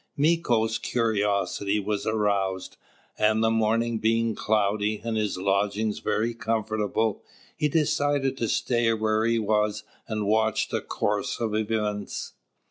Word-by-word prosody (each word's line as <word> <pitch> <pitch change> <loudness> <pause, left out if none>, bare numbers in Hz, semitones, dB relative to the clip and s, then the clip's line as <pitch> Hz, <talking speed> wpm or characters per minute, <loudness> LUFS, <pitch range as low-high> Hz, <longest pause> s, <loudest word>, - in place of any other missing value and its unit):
Mīko's 125 -8 +2
curiosity 105 -3 0
was 105 0 -2
aroused; 100 -3 0 0.4
and, 110 +1 +3
the 110 - +3
morning 115 +1 +1
being 115 +1 +1
cloudy, 105 0 0
and 115 -1 -2
his 105 -3 -1
lodgings 100 +3 0
very 115 +2 0
comfortable, 110 -1 -1 0.3
he 150 - 0
decided 145 -3 +1
to 115 - -1
stay 120 -2 +1
where 110 0 +1
he 115 0 +2
was 105 -1 0 0.2
and 110 -2 -2
watch 110 +1 +1
the - - -1
course - - -2
of 115 -3 -1
events. 105 -2 -2
110 Hz, 125 wpm, -26 LUFS, 105-115 Hz, 0.4 s, and